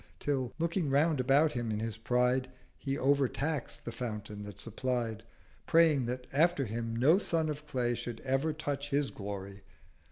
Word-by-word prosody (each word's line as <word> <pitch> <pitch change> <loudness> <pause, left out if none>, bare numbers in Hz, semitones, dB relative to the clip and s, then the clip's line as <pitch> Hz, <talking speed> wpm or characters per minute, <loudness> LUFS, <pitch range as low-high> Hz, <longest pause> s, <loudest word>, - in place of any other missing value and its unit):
Till, 135 -4 -1
looking 170 -1 0
round 145 +2 +3
about 140 +4 +4
him 120 -2 -2
in 105 - -1
his 110 -1 -3
pride, 125 +3 +1 0.3
He 135 0 -2
overtax'd 140 +1 0
the 120 - -3
Fountain 105 -4 -5
that 105 -2 -9
supplied, 115 -1 -2 0.5
Praying 155 -6 +4
that 125 +1 -3
after 155 -1 +3
him 115 +1 -3
no 145 +10 +5
Son 165 -5 0
of 150 0 -5
Clay 125 -3 0
390 120 - -4
Should 120 -1 -5
ever 135 +4 +1
touch 145 -2 -3
his 140 -1 +1
Glory. 100 -1 -6
130 Hz, 165 wpm, -32 LUFS, 115-145 Hz, 0.5 s, no